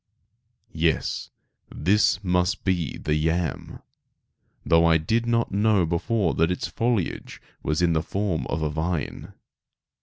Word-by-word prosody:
Yes, - - 0 0.4
this 100 +3 +2
must 90 +2 0
be 90 -7 -1
the 75 - -2
yam, 80 +2 -2 0.8
though 80 0 +4
I 85 -1 +5
did 115 +9 0
not 115 0 +1
know 100 -2 +3
before 85 +3 0
that 80 +1 +2
its 90 - -2
foliage 115 -6 -2 0.2
was 80 +3 0
in 85 -1 +3
the 80 - +1
form 95 -1 -2
of 80 +1 -2
a 75 - 0
vine. 80 +1 -3
90 Hz, 130 wpm, -25 LUFS, 80-105 Hz, 0.8 s, I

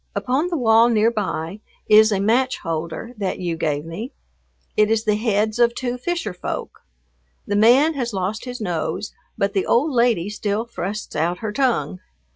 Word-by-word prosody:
Upon 270 +7 0
the 350 -2 -2
wall 230 -2 +5
near 225 0 +3
by 195 -4 -3 0.3
is 215 0 +6
a 200 - +1
match 245 +6 +2
holder 165 +8 -5
that 195 -3 -2
you 175 -2 -2
gave 150 -2 -2
me. 210 - -6 0.6
It 215 0 +3
is 225 0 +1
the 215 -2 +2
heads 215 +1 0
of 235 0 +4
two 245 -1 -2
fisher 335 - -2
folk. 180 - -5 0.7
The 205 - -1
man 250 +9 +5
has 245 -5 -3
lost 200 +3 -3
his 250 -1 -6
nose, 180 +1 -3 0.2
but 200 0 0
the 195 -3 0
old 285 +7 +2
lady 235 -8 +2
still 210 +1 -2
thrusts 210 -4 -5
out 170 +4 0
her 210 - -2
tongue. 240 -6 0
215 Hz, 175 wpm, -21 LUFS, 195-240 Hz, 0.7 s, is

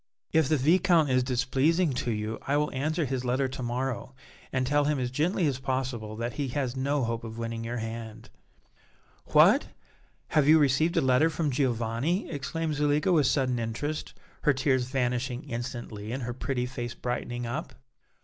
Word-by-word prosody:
If 160 -4 +3
the 155 - +3
Viscount 165 +1 +4
is 130 0 +4
displeasing 135 +6 +1
to 125 - -2
you 110 0 -2
I 140 +1 +2
will 150 0 0
answer 155 +5 -1
his 130 -1 -2
letter 130 +2 +1
to 130 - -6
morrow 125 +2 -3 0.4
and 130 0 0
tell 145 +2 +2
him 150 0 +1
as 125 -1 -2
gently 165 +6 +1
as 135 -3 0
possible 130 -5 -3
that 115 +2 -3
he 145 -2 -2
has 130 -1 -2
no 140 +1 0
hope 115 0 -2
of 115 0 -7
winning 115 0 -4
your 120 +1 -3
hand." 115 0 -6 0.9
"What! - - +5 0.6
have 150 -2 +3
you 155 +1 +8
received 155 +3 +2
a - - +5
letter 130 +5 +4
from 155 -2 -1
Giovanni?" 125 - 0
exclaimed 155 +2 -2
Zuleika, 150 +4 +2
with 150 -6 +4
sudden 130 -3 +1
interest, 120 +7 -3 0.3
her 150 - +4
tears 130 -1 +1
vanishing 125 -1 -1
instantly 115 -3 -5
and 130 +1 -3
her 120 +1 -3
pretty 125 0 -2
face 120 -1 -5
brightening 120 0 -3
up. 135 +7 -4
130 Hz, 175 wpm, -28 LUFS, 120-145 Hz, 0.9 s, you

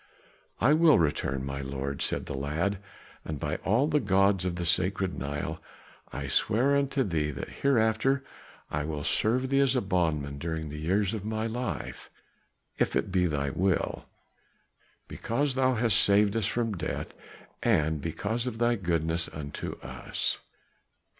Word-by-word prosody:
"I 130 +7 +5
will 160 -1 +6
return, 70 -4 0
my 70 0 -4
lord," 70 +1 -4
said - - 0
the - - -5
lad, 80 +8 -1 0.4
"and 75 -2 -5
by 75 +2 -2
all 115 +8 +2
the 150 -1 +2
gods 95 -3 +3
of 90 -1 -1
the 85 -1 -3
sacred 95 +2 +1
Nile, 75 +4 -4 0.5
I 70 - -4
swear 120 - +2
unto 140 -1 +1
thee 80 -8 0
that 75 - -5
hereafter 135 +1 +2 0.5
I 75 - -1
will 75 -1 -4
serve 125 - +1
thee 135 0 +3
as 135 -1 +3
a - - +4
bondman 80 -7 0
during 80 0 -3
the 75 +1 -6
years 95 +6 +1
of 110 -3 -4
my 110 +1 -2
life 120 +2 -4 0.7
if - - +1
it - - 0
be 90 -1 +3
thy 70 -3 -1
will; 95 +1 0 1.0
because 140 +4 -1
thou 130 -1 +2
hast 115 -2 +3
saved 100 +1 +4
us 110 -3 +1
from 115 -1 -1
death, 85 - -4 0.5
and 80 -1 +2
because 110 - -2
of 125 - -3
all 120 0 +3
thy 120 - +1
goodness 85 -3 0
unto 70 -2 -6
us." - - -2
95 Hz, 160 wpm, -28 LUFS, 75-115 Hz, 1.0 s, will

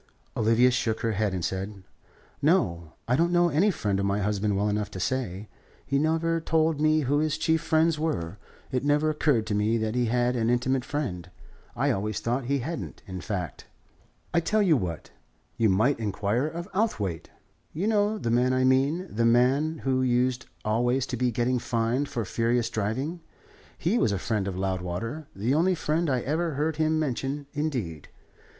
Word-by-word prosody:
Olivia 115 +3 +4
shook 115 -2 -1
her 115 -1 0
head, 105 0 0
and 90 -2 -2
said: 95 +1 -4 0.6
"No. 85 - +1
I 125 - +3
don't 170 +5 +2
know 175 0 +4
any 170 +7 +3
friend 105 - -1
of 100 - 0
my 100 +1 +1
husband 105 0 0
well 100 +1 +1
enough 105 -1 -1
to 95 - -7
say. 105 -3 -2 0.4
He 140 0 +1
never 165 +2 +1
told 160 -1 +1
me 155 0 +4
who 145 +1 +1
his 155 -1 0
chief 160 -1 +1
friends 160 -1 +2
were. 100 - -2 0.3
It 130 -1 -1
never 150 +2 +2
occurred 145 -7 +1
to 110 - -2
me 105 +3 +2
that 110 -1 -1
he 125 -1 +1
had 120 +1 +1
an 115 -1 +1
intimate 125 +1 +1
friend. 95 - -4 0.5
I - - +1
always 105 +2 -2
thought 120 +2 -1
he 140 +3 +1
hadn't, 165 0 -6
in 95 -2 -6
fact." 90 -3 -5 0.7
"I 170 - +4
tell 210 +6 +1
you 175 -5 +4
what: 90 - -4 0.4
you 110 -2 +2
might 115 +8 +2
inquire 105 +5 0
of 170 +3 -6
Outhwaite, 105 - -1 0.4
you 170 +6 -3
know 210 0 +2
the 120 - -2
man 125 +2 +3
I 130 0 +2
mean, 135 +7 +2
the 115 -5 +1
man 135 +7 +2
who 130 -1 +2
used 125 0 +1 0.2
always 120 +4 +1
to 130 - -4
be 125 +1 +1
getting 120 +2 0
fined 120 +4 -1
for 115 -3 -3
furious 115 +4 0
driving. 130 - -2 0.6
He 205 +8 +1
was 110 - +2
a 100 - 0
friend 105 0 -1
of 95 -2 -3
Loudwater, 95 - -3
the 110 +7 0
only 175 +5 +3
friend 160 0 0
I 130 -2 +1
ever 160 +3 -1
heard 150 +2 -1
him 155 0 +2
mention, 140 -1 -2
indeed. 125 - -3
125 Hz, 185 wpm, -27 LUFS, 105-155 Hz, 0.7 s, Olivia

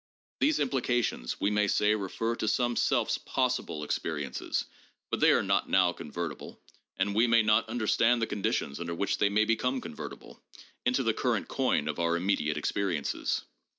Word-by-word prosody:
These 295 +1 +3
implications, 120 - -1
we 100 - +1
may 105 0 +2
say, 105 +2 +3
refer 110 +3 -2
to 110 - -2
some 120 +1 +1
self's - - +1
possible 75 -1 -1
experi 75 -1 -2
ences, 65 - -3 0.5
but - - 0
they - - +5
are - - +3
not - - +1
now 90 -2 +4
convertible, 85 0 -6 0.4
and 100 +2 0
we 115 +4 +4
may 115 -1 +5
not 105 +1 +3
understand 115 +1 +2
the 115 - +1
conditions 95 -9 -2
under 85 0 -4
which 100 +4 -1
they 100 - +3
may 105 +2 +2
become 125 +4 0
convertible, - - -9 0.5
into - - +2
the - - +2
current - - -1
coin 75 - 0
of 75 0 -3
our 85 0 +1
immediate 85 -5 0
experiences. 85 -1 -1
100 Hz, 170 wpm, -29 LUFS, 85-115 Hz, 0.5 s, they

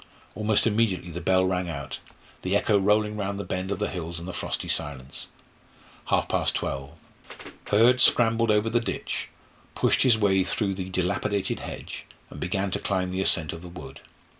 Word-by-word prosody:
Almost 105 0 +2
immediately 105 -5 +1
the 85 +2 -5
bell 95 +2 +3
rang 90 -1 -1
out, 70 -4 -5 0.4
the 95 +2 0
echo 105 +1 +2
rolling 105 +2 +2
round 100 -1 -3
the - - -3
bend 95 0 -3
of 100 - -1
the 105 - -1
hills 85 -2 -4
in 85 - -8
the 90 - -6
frosty - - -3
silence. 70 -2 -2 0.8
Half - - +1
past - - 0
twelve 70 +1 -3 0.7
Hurd 120 +5 +5
scrambled 115 -2 +4
over 105 +1 +2
the 120 - +3
ditch, 115 - -3 0.5
pushed - - +2
his 125 -4 +5
way 95 -3 +3
through 100 +1 0
the 95 -1 -5
dilapidated 95 +2 -1
hedge, - - -7 0.2
and - - -9
began 95 +2 -1
to - - -1
climb 90 -2 -1
the 95 +1 -1
ascent 80 -5 +3
of 85 - -8
the 90 - -9
wood. 70 -6 -10
95 Hz, 180 wpm, -26 LUFS, 90-105 Hz, 0.8 s, Hurd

